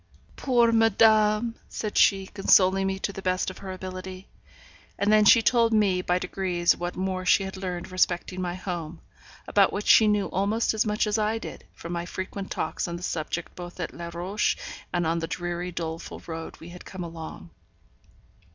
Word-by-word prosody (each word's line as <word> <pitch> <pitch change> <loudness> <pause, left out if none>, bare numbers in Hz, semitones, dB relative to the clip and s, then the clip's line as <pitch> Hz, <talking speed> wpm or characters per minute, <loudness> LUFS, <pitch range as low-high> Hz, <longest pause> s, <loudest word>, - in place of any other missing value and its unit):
'Poor 240 -3 +3
madame,' 225 0 +4 0.2
said 215 -2 -4
she, 195 -1 +4
consoling 195 -1 +3
me 190 0 -1
to 200 +1 -3
the 195 - -7
best 185 0 0
of - - -13
her 190 - -7
ability. 185 0 -7 0.7
And 205 +1 +2
then 215 -1 +5
she 225 +2 +7
told 230 -2 +3
me 200 -4 +3
by 180 0 +1
degrees 180 -1 0
what 175 0 -4
more 185 0 -2
she 190 +2 +4
had 190 0 -6
learned 180 -2 -5
respecting 185 0 0
my 175 -1 -3
home, 175 -3 -6 0.5
about 200 -2 +4
which 205 - -4
she 220 - +7
knew 210 -1 +2
almost 205 +5 0
as 220 +1 +1
much 210 +1 +1
as 210 +1 0
I 215 +1 +1
did, - - -9
from 170 +1 -7
my 170 0 -3
frequent 190 +1 -5
talks - - -3
on 170 - -4
the 175 - -8
subject 165 0 -3
both 175 0 -9
at 175 - -4
Les 170 0 -7
Rochers 185 +5 0 0.4
and 175 -1 0
on 165 +1 0
the 165 - -3
dreary, 175 +1 -4
doleful 165 -1 -5
road 165 -1 -7
we 165 - -11
had 180 +1 -11
come 185 -2 -7
along. 165 -1 -8
185 Hz, 190 wpm, -26 LUFS, 175-210 Hz, 0.7 s, she